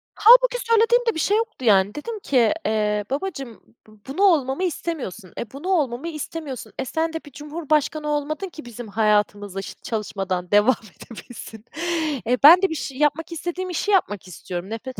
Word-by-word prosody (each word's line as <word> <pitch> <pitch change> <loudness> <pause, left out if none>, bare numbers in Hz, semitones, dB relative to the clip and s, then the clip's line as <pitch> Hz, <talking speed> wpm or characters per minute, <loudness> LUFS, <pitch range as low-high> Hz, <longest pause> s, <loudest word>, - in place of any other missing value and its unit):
Hâlbuki - - +6
söylediğim 460 +2 +4
de 460 - +1
bir - - -3
şey 410 +6 +2
yoktu, 450 - -3
yani 200 -1 +4
dedim 435 +9 -5
ki, 255 - +2
eee, 210 -1 0
babacığım 275 - -5 0.3
bu 215 -1 -19
bunu 275 +8 -4
olmamı 300 -5 +3
istemiyorsun, 280 - -4
e, 220 - -5
bunu 285 +7 -8
olmamı 290 -5 0
istemiyorsun, 300 -7 -6
e, - - -1
sen 320 +5 -2
de - - -2
bir 290 - -13
cumhurbaşkanı 300 +1 -2
olmadın 300 +5 -2
ki 310 -5 -11
bizim 240 -1 -9
hayatımıza 205 -2 0
şı - - -9
çalışmadan 195 -5 -3
devam 210 +5 +5 0.2
edebilsin. 225 -1 -11 0.6
E, 250 +2 +2
ben 335 +5 +10
de 385 - +2
bir 320 - -3
şey 270 -3 -5
yapmak, 300 +3 0
istediğim 350 +3 -4
işi 360 +4 -1
yapmak 205 - +1
istiyorum. 180 +1 -7
Nefret 250 +4 -6
280 Hz, 170 wpm, -23 LUFS, 215-335 Hz, 0.6 s, ben